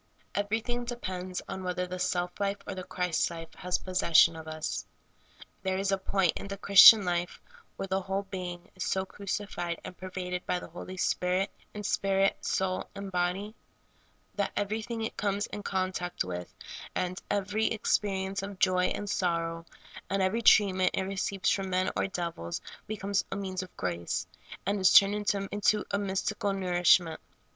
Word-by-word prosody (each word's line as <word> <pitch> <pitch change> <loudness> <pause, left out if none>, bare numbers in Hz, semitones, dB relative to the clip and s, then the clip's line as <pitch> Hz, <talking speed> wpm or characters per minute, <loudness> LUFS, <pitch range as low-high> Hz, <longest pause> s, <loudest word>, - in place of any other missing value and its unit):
Every 205 +3 0
thing 240 +1 -3
depends 185 -7 -4
on 190 - -5
whether 180 0 -1
the 180 0 -6
self 180 0 -1
life 200 0 0
or - - -4
the 185 -1 -6
Christ 180 -2 0
life 165 -1 -8
has 180 +1 0
possession 170 -2 +4
of 160 0 -9
us. 155 0 -3 0.8
There 190 -1 -1
is 195 +1 0
a 195 - +3
point 190 -2 +1
in - - -5
the 200 0 -5
Christian 200 +1 +9
life 175 0 -1 0.4
where - - -4
the 190 0 -1
whole 195 +1 -2
being 180 -2 -6
is 185 - -4
so 190 0 0
crucified 190 -4 -4
and - - -8
per\'aded 180 -1 -5
by - - +1
the - - -10
Holy 185 +2 -8
Spirit, 185 +2 +1 0.2
in 210 - -5
spirit, 195 -1 +1
soul, 185 -1 -1
and 200 -1 -6
body, 180 +4 -1 0.8
that 200 -1 -1
everything 220 +3 -2
it 220 - -4
coines 200 0 0
in 205 - -6
contact 185 -2 -2
with, 90 -1 -6 0.4
and 180 0 -2
every 205 +2 0
ex 225 - +2
perience 195 -1 -2
of 200 0 -6
joy 185 -1 +3
and 205 - -2
sorrow, 165 -3 -1 0.4
and 195 0 +1
ever}^ 220 +5 0
treatment 190 -4 +5
it 190 - 0
re 195 +1 -4
ceives 195 0 0
from 195 -1 -2
men 185 0 +1
or - - +1
devils, 170 - -4 0.3
becomes 200 -2 -1
a - - -2
means 190 -2 -3
of 185 - -11
grace, 85 -2 -2 0.4
and 200 +2 0
is 185 - +6
turned 200 0 +8 0.2
into 205 +1 +1
a 200 - +1
mystical 200 +1 -1
nourishment. 175 -3 +3
190 Hz, 170 wpm, -29 LUFS, 180-200 Hz, 0.8 s, Christian